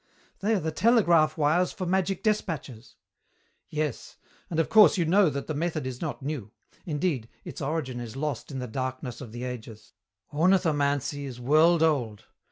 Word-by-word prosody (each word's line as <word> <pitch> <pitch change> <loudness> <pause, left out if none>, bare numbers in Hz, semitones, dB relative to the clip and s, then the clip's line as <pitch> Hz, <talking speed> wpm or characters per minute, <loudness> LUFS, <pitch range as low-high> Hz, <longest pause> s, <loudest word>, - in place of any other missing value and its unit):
"They 215 +3 +1
are - - +1
the 160 -1 -2
telegraph 170 -6 +3
wires 160 +4 +2
for 185 - -5
magic 190 +1 0
despatches." 160 - -2 0.7
"Yes. 150 -4 -4 0.3
And 165 - -2
of 165 - +2
course 215 -1 +6
you 170 - +1
know 185 +2 +4
that 140 -1 -4
the 155 - -3
method 155 -1 -2
is 130 -1 -5
not 155 -4 -4
new. 135 -8 -4 0.4
Indeed, 145 -7 -1 0.2
its - - -7
origin 135 -4 -2
is 120 -1 -7
lost 145 -3 -3
in 135 - -6
the 125 - -3
darkness 130 0 -5
of 120 -5 -8
the 120 +2 -6
ages. 120 -3 -8 0.4
Ornithomancy 145 -5 +1
is 125 -3 -7
world 155 +6 +4
old. 125 -10 0
150 Hz, 170 wpm, -27 LUFS, 130-170 Hz, 0.7 s, course